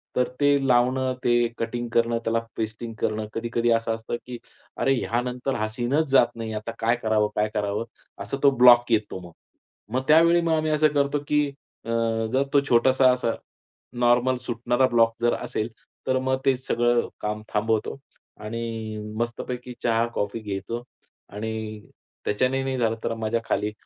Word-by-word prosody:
तर 125 -1 +2
ते 145 -1 +3
लावणं, 130 +1 +2
ते 120 -1 +3
कटिंग 120 +1 -3
करणं, 115 0 +2
त्याला 115 0 +1 0.2
पेस्टिंग 110 +1 -4
करणं, 110 0 -1
कधी-कधी 115 +1 -1
असं 115 0 +1
असतं, 115 +1 -5
की 125 -1 -7 0.4
"अरे 135 - +3
ह्यानंतर 125 +2 -2
हा 110 -1 -1
सीनच 125 +8 0
जात 135 -3 +5
नाही 115 -1 -5
आहे. 110 - -3
आता 115 +2 -6
काय 115 +2 +2
करावं? 110 -1 +2
काय 105 0 +1
करावं?" 105 +1 -1 0.4
असा 135 - -4
तो 140 - +8
ब्लॉक 120 -1 +7
येतो 105 -4 0
मग. 85 - -14 0.6
मग 130 - +2
त्यावेळी 170 +2 +6
मग 165 -1 0
आम्ही 155 0 +1
असं 155 0 +4
करतो 140 0 +1
की 150 0 +3 0.4
अ, - - -7 0.4
जर 135 +1 +3
तो 140 - +6
छोटासा 130 +2 +5
असा 125 -2 0 0.7
नॉर्मल 125 +1 +3
सुटणारा 120 +2 +1
ब्लॉक 115 -2 +3
जर 120 - +3
असेल, 110 +2 -3 0.4
तर 130 - +2
मग 130 0 0
ते 135 -1 +4
सगळं 120 -1 +1
काम 105 0 -3
थांबवतो 110 +2 0 0.5
आणि 115 -1 -4 0.2
मस्तपैकी 125 +1 -4
चहा-कॉफी 115 -2 0
घेतो 110 +3 -4 0.5
आणि 110 +2 -4 0.7
त्याच्यानेही 130 +5 +1
नाही 135 -1 -2
झालं 115 -2 +1
तर - - -1
माझ्या 115 +1 -1
खाली, 105 +1 -1
120 Hz, 160 wpm, -25 LUFS, 115-130 Hz, 0.7 s, तो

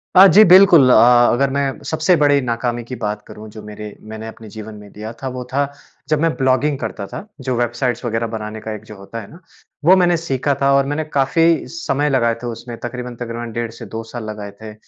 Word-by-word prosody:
अ, 190 - +10
जी, 210 +3 +7
बिल्कुल 180 -7 +7
अ, - - +6 0.4
अगर 135 +3 +1
मैं 140 -1 -2
सबसे 160 +3 +2
बड़ी 145 -2 +3
नाकामी 120 -1 -2
की 125 +2 -7
बात 105 -2 -4
करूँ, 110 +1 -11
जो 110 +1 -11
मेरे 105 0 -9 0.2
मैंने 110 0 -7
अपने 110 -1 -11
जीवन 110 +1 -9
में 105 -1 -13
दिया 110 +1 -7
था, 135 - -4
वो 125 -1 -5
था, 140 0 0 0.4
जब 155 -1 +2
मैं 165 - +2
ब्लॉगिंग 135 +2 +1
करता 110 -3 -5
था, 205 - -8
जो 130 -1 -2
वेबसाइट्स 120 +1 -1
वगैरह 115 0 -1
बनाने 110 -1 -6
का 110 - -5
एक 105 - -11
जो - - -9
होता 100 +4 -8
है 100 - -12
ना, 165 - -14 0.5
वो 185 - +7
मैंने 175 -2 +3
सीखा 140 -3 -1
था 140 0 +3
और 140 0 +3
मैंने 145 +2 -2
काफ़ी 165 +4 +2
समय 150 -3 -1
लगाए 115 -4 +2
थे - - -3
उसमें, 120 0 -7
तकरीबन-तकरीबन 120 -1 -6
डेढ़ 115 0 -3
से 115 - -10
2 115 0 -6
साल 120 -2 -5
लगाए 105 -1 -7
थे। 110 -1 -8
120 Hz, 220 wpm, -19 LUFS, 110-140 Hz, 0.5 s, अ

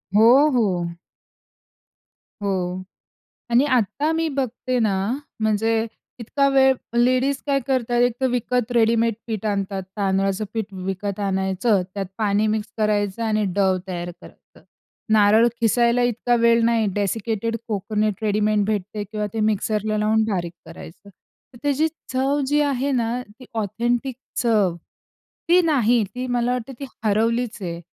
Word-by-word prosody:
हो, 245 +8 +6
हो. 185 -9 0 1.5
हो 185 -2 -2 0.7
आणि 240 +4 +4
आता 280 +8 -1
मी 325 0 0
बघते 255 -1 -1
ना 215 -3 +2 0.5
म्हणजे 220 +1 +1 0.3
इतका 275 +4 +1
वेळ 265 -1 +5 0.2
लेडीज 255 +3 +3
काय 280 -1 +2
करतात 245 -3 +1
एक 245 0 +3
तर 260 - +3
विकत 245 0 -1
रेडीमेड 230 -1 +3
पीठ 220 -3 -4
आणतात. 195 -1 -2
तांदळाचं 195 0 0
पीठ 220 -3 -1 0.2
विकत 195 +1 -3
आणायचं, 190 +1 +1
त्यात 200 -1 -3
पाणी 210 0 +2
मिक्स 215 0 -1
करायचं 210 0 0
आणि 215 -1 +1
डव 190 -2 +3
तयार 175 -1 -4
करायचं, - - -17 0.5
नारळ 215 +2 +5
किसायला 235 +1 +3
इतका 245 0 +1
वेळ 230 0 +4
नाही 230 -1 +2
डेसिकेटेड 225 +2 -1
कोकोनट 210 0 -1
रेडीमेड 210 0 +1
भेटते 210 0 -2
किंवा 210 +1 -4
ते 225 - -2
मिक्सरला 215 +1 -1
लावून 215 +1 +2
बारीक 175 -4 -2
करायचं. 165 +3 -12 0.5
तर - - -13
त्याची 290 +2 +2 0.2
चव 270 +3 +1
जी 295 +2 +2
आहे 280 -1 0
ना 240 -1 0 0.2
ती 255 - -12
ऑथेंटिक 235 +4 -1 0.3
चव 210 -7 +2 0.7
ती 355 +2 +6
नाही 245 -7 +3
ती. 250 +6 -6
मला 245 0 0
वाटतं 250 +1 -4
ती - - -4 0.2
हरवलीचं 225 +1 0
आहे. 170 -1 -4
220 Hz, 135 wpm, -22 LUFS, 205-245 Hz, 1.5 s, हो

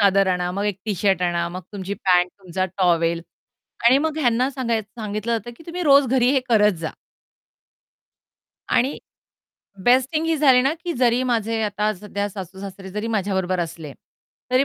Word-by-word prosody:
चादर 195 -1 +4
आणा, 180 -1 0
मग 200 +2 -2
एक 200 -2 -2
टी-शर्ट 195 -3 +1
आणा, 170 -1 0
मग 180 +2 -7
तुमची 200 0 -4
पँट, 180 -2 +2
तुमचा 185 0 -2
टॉवेल 170 -2 +2 0.6
आणि 255 +3 +6
मग 315 +1 -1
ह्यांना 250 -1 +2
सांगायचं 230 -4 -3
सांगितलं 215 +2 -3
जातं 225 +2 -7
की 325 - -16
तुम्ही 350 +1 -4
रोज 280 -3 +6
घरी 250 0 +3
हे 270 - +3
करत 210 -2 +5
जा. 160 - -4 1.8
आणि 265 +4 +2 0.9
बेस्ट 255 +1 +4
थिंग 320 +1 0
ही 325 0 +1
झाली 270 -4 +5
ना 270 +3 +2
की 345 - -1
जरी 245 -3 +2
माझे 230 -2 0
आता 210 0 0
सध्या 205 +1 -4
सासू-सासरे 190 0 -8
जरी 210 +3 -4
माझ्याबरोबर 190 -4 -1
असले, 160 -3 -5 0.6
तरी 255 +2 +4
210 Hz, 165 wpm, -22 LUFS, 185-250 Hz, 1.8 s, आणि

